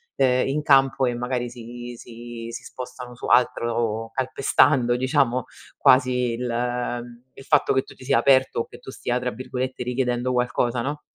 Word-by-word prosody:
ehm, 130 -1 +2
in 150 +2 0
campo 135 -2 +4
e 125 - 0
magari 125 0 -2
si 120 0 -9
si 115 0 -9
si - - -7
spostano 125 -1 -8
su - - -8
altro 115 -2 +1
calpestando 130 -1 +2
diciamo, 130 -2 +1 0.3
quasi 125 -2 +3
il 125 +1 -3
ehm, 120 0 -3
il 135 - -13
fatto 150 -3 +3
che 130 - +2
tu - - -14
ti - - -14
sia 135 0 +3
aperto 130 -3 +3
o - - -4
che - - -13
tu - - -11
stia 125 -1 -2
tra 125 0 -2
virgolette 130 +1 -4
"richiedendo 125 0 -1
qualcosa", 125 -1 0
no? 145 +3 -4
125 Hz, 170 wpm, -24 LUFS, 120-130 Hz, 0.3 s, campo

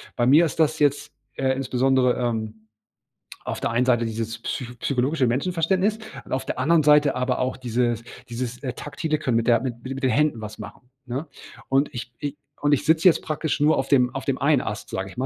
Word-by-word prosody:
bei 120 - +1
mir 150 +6 +6
ist 160 - -5
das 155 0 +2
jetzt, 145 -1 +1 0.2
äh, 130 -1 +1
insbesondere, 130 -1 +2
ähm, 110 -2 -3 0.8
auf - - -4
der - - -1
einen 120 +2 +2
Seite 120 -2 +2
dieses 115 0 -4
psycho 125 0 -5
psychologische 135 0 +1
Menschenverständnis 185 - 0 0.3
und - - -14
auf 130 - -1
der - - -4
anderen 155 +3 +3
Seite 150 -2 +5
aber 125 0 -1
auch 130 0 -1
dieses 120 -2 -1 0.3
dieses, 120 0 -5
äh, 125 -2 -3
taktile 155 +3 -3
Können 130 -6 0
mit 115 - -1
der 115 -1 +4
mit 120 -3 -5
mit 135 +1 -5
den 130 - +3
Händen 150 -2 +2
was 105 0 -8
machen, 105 +4 -11 0.2
ne? 135 +6 -4 0.4
Und 135 +2 +2
ich 120 0 -7
i 145 0 -3 0.2
und 145 0 +2
ich 140 - +1
sitze 160 +3 +4
jetzt 170 - +5
praktisch 155 -2 -2
nur 150 +2 +4
auf 135 - -2
dem 125 -3 +3
auf 135 - -4
dem 135 -2 -1
einen 140 -1 +3
Ast, 105 - -5
sage 95 0 -4
ich 120 - -14
mal, 130 - -1
130 Hz, 215 wpm, -24 LUFS, 120-145 Hz, 0.8 s, mir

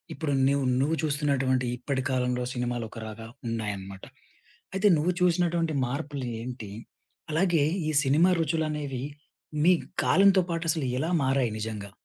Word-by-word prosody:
ఇప్పుడు 150 -3 -2
న్యు 140 +1 +3 0.2
నువ్వు 155 +4 +1
చూస్తునటువంటి 140 -4 +1
ఇప్పటి 130 +1 -2
కాలంలో 125 -1 0
సినిమాలొకరాగా 115 -2 -4 0.2
ఉన్నాయన్నమాట. 100 -4 -4 0.7
అయితే 200 +2 +3
నువ్వు 175 +4 +1
చూసినటువంటి 170 -3 +2
మార్పులేంటి? 125 -5 -5 0.6
అలాగే 165 -2 +3 0.3
ఈ 155 - -1
సినిమా 155 +7 +4
రుచులనేవి 150 -4 -2 0.6
మీ 180 - +7 0.3
కాలంతోపాటసలెలా 165 -6 +2
మారాయి 130 -4 +1
నిజంగా? 105 -2 -5
140 Hz, 100 wpm, -27 LUFS, 120-160 Hz, 0.7 s, మీ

